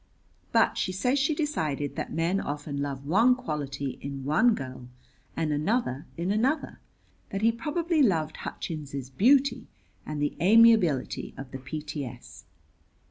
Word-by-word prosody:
But - - +3
she 185 - 0
says 250 +9 +1
she 280 +3 +1
decided 155 - -2
that - - -4
men 170 +4 0
often 145 -1 -4
love 140 -1 -4
one 225 - +4
quality 140 - -4
in 140 -1 -6
one 215 - +3
girl 130 -2 -7 0.5
and 155 -2 0
another 150 - -1
in 175 +3 -1
another; 265 +8 0 0.5
that 195 +2 -3
he 230 - +5
probably 310 +7 0
loved 160 - +2
Hutchins's 140 -5 -6
beauty 255 - +3 0.4
and 150 -1 -5
the 145 0 -1
amiability 205 - +4
of 135 -1 -8
the 135 - -6
P.T.S. 145 -1 -7
160 Hz, 135 wpm, -27 LUFS, 140-230 Hz, 0.5 s, he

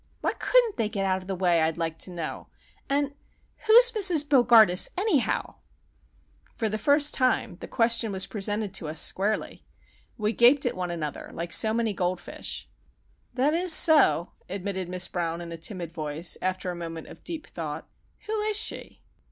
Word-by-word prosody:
Why - - 0
couldn't 485 -4 +2
they 225 -3 0
get 200 -3 -2
out 190 0 0
of 185 - -14
the 195 - -3
way, 175 -2 +2
I'd 160 +1 0
like 165 -1 -3
to - - -1
know? 170 -3 -6 0.4
and—who's 290 - +2
Mrs. 365 -9 +3
Bogardus, 235 -9 +5
anyhow?" 380 - 0 1.0
For 220 - -1
the 215 +1 -3
first 285 +5 +2
time 255 -8 0
the - - -9
question 230 -2 +1
was 190 -1 -1
presented 205 -1 -3
to 170 - -4
us 155 +1 -3
squarely. 205 +3 -1 0.5
We 210 +1 -1
gaped 255 +5 +5
at 245 - -1
one 180 -1 -3
another, 155 -4 -5
like 170 0 -4
so 220 - +4
many 225 -1 0
goldfish. 180 -1 -4 0.7
"That 270 +4 +2
is 350 0 +1
so," 305 - +5 0.2
admitted 190 -1 -4
Miss 180 0 0
Brown 170 -1 -3
in 170 -1 -8
a - - -5
timid 170 0 -6
voice, 155 +1 -2
after 185 0 -2
a - - -6
moment 165 -2 -7
of - - -14
deep 325 -3 -6
thought. 155 -2 -7 0.4
"Who 430 0 -2
is 425 0 0
she?" 440 - -3
200 Hz, 170 wpm, -26 LUFS, 175-280 Hz, 1.0 s, Bogardus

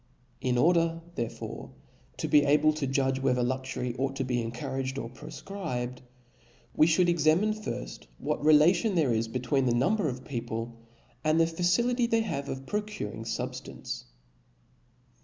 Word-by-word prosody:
In 125 -1 +1
order 165 +3 +3
therefore 120 -7 -5 0.5
to - - -2
be 150 - +6
abk 150 +2 +4
to 140 -3 -1
judge 135 0 +1
whether 125 -2 +2
luxury 130 -1 -2
ought 135 0 -1
to 135 - -1
be 125 -1 -1
encou 115 +3 -5
raged 130 0 -2
or 115 -3 -5
profcribedj 125 -5 -5 0.8
we 155 - +5
(hould 170 +2 +4
examine 170 +5 +3
firft 210 - -6
what - - -2
telatioii 155 +8 +5
there 150 -8 +3
is 115 0 0
between 130 +3 0
the 120 - +2
number 180 - +2
of 130 0 -6
people 115 -2 -4 0.5
and 155 +1 +3
the 165 - +6
facility 210 +9 +1
they 230 -1 +2
have 145 -10 -3
of 135 0 -5
procuring 205 - -4
fubfiftence. 115 -1 -5
140 Hz, 150 wpm, -29 LUFS, 125-170 Hz, 0.8 s, be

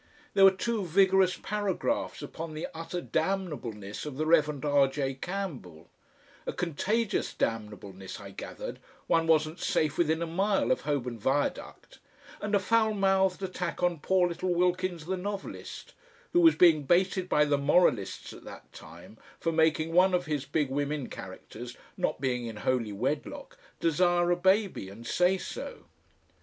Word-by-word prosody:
There 195 - +7
were - - +10
two 210 +3 -2
vigorous 190 +1 +3
paragraphs 205 -3 -2
upon 160 -1 -7
the 155 - -3
utter 165 +2 -5
damnableness 125 - -3
of 140 -3 -6
the 155 - -1
Rev. 150 -3 +2
R. 145 -2 +4
J. 135 0 -2
Campbell, 135 - -6 0.6
a - - -2
contagious 200 +7 -1
damnableness 105 -4 -4
I 100 -1 -10
gathered, 95 - -7 0.3
one 165 0 +2
wasn't 155 0 +2
safe 155 0 0
within 160 0 +2
a - - -1
mile 195 +3 +1
of 130 - +1
Holborn 125 -5 -2
Viaduct, 135 +7 -2 0.4
and 210 0 0
a - - +4
foul 220 +2 +2
mouthed 195 -1 +2
attack 180 -2 -4
on 175 -3 +1
poor 185 +3 +2
little 175 +1 -2
Wilkins 180 -2 0
the 190 +2 -2
novelist 200 +1 -6 0.4
who 350 - +5
was 330 -1 +7
being 165 -4 +6
baited 185 +3 +2
by 150 - +4
the 145 -1 +1
moralists 140 - +2
at - - -13
that - - -12
time 110 - -13 0.2
for 165 - 0
making 160 0 +2
one 185 +1 +5
of 180 0 -1
his 150 -3 -2
big 145 -1 -1
women 145 0 -2
characters, 115 +6 -9 0.2
not - - -1
being 125 -3 -1
in 115 - -6
holy 115 0 -1
wedlock, 100 - -3 0.2
desire 175 +1 +2
a - - +4
baby 190 - +1
and 110 +4 -11
say 180 +8 +2
so.... 475 - -7
165 Hz, 155 wpm, -29 LUFS, 135-185 Hz, 0.6 s, were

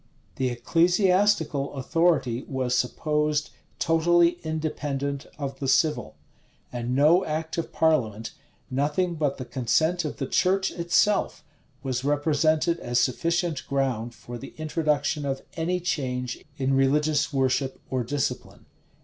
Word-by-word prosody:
The 130 -1 +1
ecclesiastical 170 - +2
authority 135 -4 +1
was 130 -2 -1
supposed 150 +3 0 0.3
totally 170 +1 +3
independent 145 -3 -3
of 135 -2 -5
the 135 - -3
civil; 155 +3 +1 0.6
and 120 +1 -2
no 155 +7 +5
act 160 0 -3
of 165 - -4
parliament, 115 -9 +1 0.4
nothing 150 +7 0
but 150 -4 -1
the 130 - -6
consent 160 +8 +1
of 150 - -4
the 135 - -2
church 190 +6 +1
itself, 175 +4 +1 0.4
was 130 -2 -2
represented 155 +3 +2
as 120 -3 0
sufficient 165 +5 0
ground 125 -4 -1
for 120 0 -9
the 135 - -10
introduction 155 -1 0
of 135 -1 -3
any 175 +2 -1
change 125 -8 -3
in 135 0 0
religious 150 +4 +2
worship 135 -1 0
or 130 -2 0
discipline. 140 +3 -3
145 Hz, 125 wpm, -26 LUFS, 130-165 Hz, 0.6 s, no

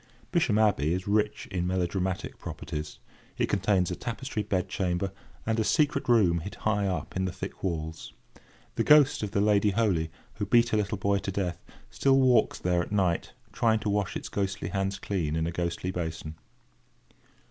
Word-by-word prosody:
Bisham 145 - +2
Abbey 90 -7 +3
is 95 +2 -5
rich 105 +1 +1
in 90 -2 -1
melodramatic 95 +1 -2
properties. 75 0 -6 0.4
It - - 0
contains 95 -2 +2
a - - -2
tapestry 120 +1 -4
bed 95 -3 -1
chamber, 90 0 -1 0.3
and 110 0 0
a - - +3
secret 150 +2 +1
room 95 -8 +4
hid 100 +5 -7
high 105 -2 0
up 95 - -3
in 95 0 0
the 95 - -2
thick - - -7
walls. 80 -3 -3 0.7
The - - +2
ghost 145 -1 +6
of 105 - -2
the 100 - 0
Lady 105 0 +4
Holy, 95 -6 +1 0.3
who 105 -2 -2
beat 120 +2 +4
her 110 - +1
little 105 -1 -1
boy 100 +1 +1
to 95 +1 -4
death, 90 -3 -3 0.3
still 135 - +3
walks 125 -4 +4
there 90 -1 +1
at 85 - -6
night, 95 -5 0 0.2
trying 110 -2 +3
to 105 - -1
wash 100 -1 -1
its - - -7
ghostly 95 -1 -2
hands 95 0 -1
clean 90 -6 -2
in 80 0 0
a 85 - -1
ghostly 85 +1 -2
basin. 80 -3 -4
95 Hz, 180 wpm, -28 LUFS, 90-105 Hz, 0.7 s, ghost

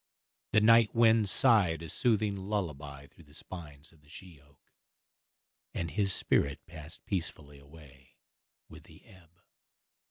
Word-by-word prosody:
The 110 - +5
night 115 0 +5
wind 115 -3 +4
sighed 95 - +3
a 80 - -8
soothing 110 +1 +1
lullaby 75 -9 -5
through 80 +3 -20
the 75 +1 -18
spines 75 -5 -10
of 80 - -24
the 75 - -24
she 85 -2 -13
oak, 70 -1 -29 1.0
and 85 -1 -3
his 100 -2 0
spirit 70 -5 0
passed 80 -1 -11
peacefully 75 -6 -5
away 70 -2 -18 0.5
with - - -14
the - - -18
ebb. 95 -4 -19
85 Hz, 135 wpm, -30 LUFS, 75-100 Hz, 1.0 s, The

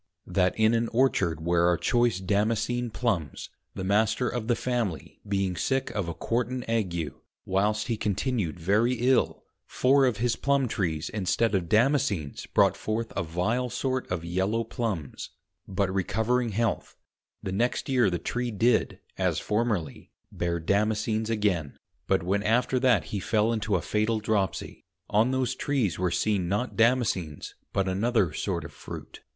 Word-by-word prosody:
_ - - -9
That 90 0 +2
in 110 +1 +4
an 115 0 +1
Orchard 95 - +1
where 85 0 +3
are 90 - +2
choice 120 -6 +2
Damascen 110 +5 0
Plumbs, 105 - -2 0.2
the 95 - -4
Master 105 +5 +2
of 120 -3 -3
the 120 - +3
Family 120 -10 -3
being 95 -2 0
sick 135 +10 -1
of 100 -5 -2
a 85 - -5
Quartan 125 +7 -1
Ague, 85 - -1 0.3
whilst 105 +3 +1
he 115 -2 -1
continued 105 - -1
very 105 +8 +2
ill, 125 +1 +1 0.2
four 135 +1 +3
of 120 -4 0
his 115 +1 +1
Plumb 140 -2 +1
trees 80 -7 -2
instead 105 +2 0
of 90 -4 0
Damascens 110 - +1
brought - - +4
forth 110 +1 -3
a - - 0
vile 95 +10 -1
sort 130 +1 -2
of 85 -2 -2
yellow 95 +6 0
Plumbs: 110 - -4 0.4
but 95 -1 -1
recovering 110 +6 0
Health, 110 +1 -2 0.5
the 95 - -3
next 115 +6 0
Year 125 -6 +3
the 90 - -1
Tree 120 +7 -2
did 115 +2 +2 0.2
(as - - +1
formerly) 105 - -2 0.2
bear 85 -1 -2
Damascens 110 +4 0
again; 100 -10 0 0.3
but - - +2
when 100 +3 0
after 125 +4 +2
that 130 -1 +3
he 100 - 0
fell 110 +3 +1
into 110 -2 0
a 85 - 0
fatal 110 +1 0
Dropsie, 105 -3 -2 0.3
on 110 +4 +4
those 130 -1 0
Trees 130 - -1
were 90 -1 +1
seen 90 0 0
not 105 +6 -1
Damascens, 115 - +1 0.2
but 95 -1 0
another 100 -2 +1
sort - - -2
of - - -10
Fruit. - - -9
110 Hz, 160 wpm, -27 LUFS, 95-120 Hz, 0.5 s, in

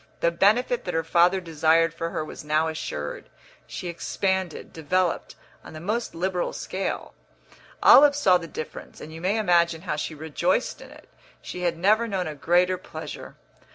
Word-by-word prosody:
The 170 - +3
benefit 235 +7 +2
that 180 - -3
her 165 - +1
father 175 +3 +3
desired 165 -1 +2
for 165 0 -4
her 155 - -3
was - - -9
now 155 +1 +1
assured; 75 - -5 0.4
she 180 - -6
expanded, 190 +1 -2
developed, 175 +3 -1 0.3
on - - -12
the 155 - -8
most 215 +4 -3
liberal 180 +1 -1
scale. 190 +1 -4 0.7
Olive 285 0 +8
saw 185 -11 +4
the 165 - -8
difference, 155 - -8
and 155 - -10
you 160 - -9
may 195 +5 +1
imagine 170 -5 +2
how 160 -5 -2
she 155 +1 -4
rejoiced 160 - -1
in - - -12
it; - - -16 0.3
she 180 - -7
had 170 -2 0
never 215 +6 +3
known 190 -4 -2
a 155 - -4
greater 180 +4 +2
pleasure. - - -9
175 Hz, 170 wpm, -25 LUFS, 160-190 Hz, 0.7 s, Olive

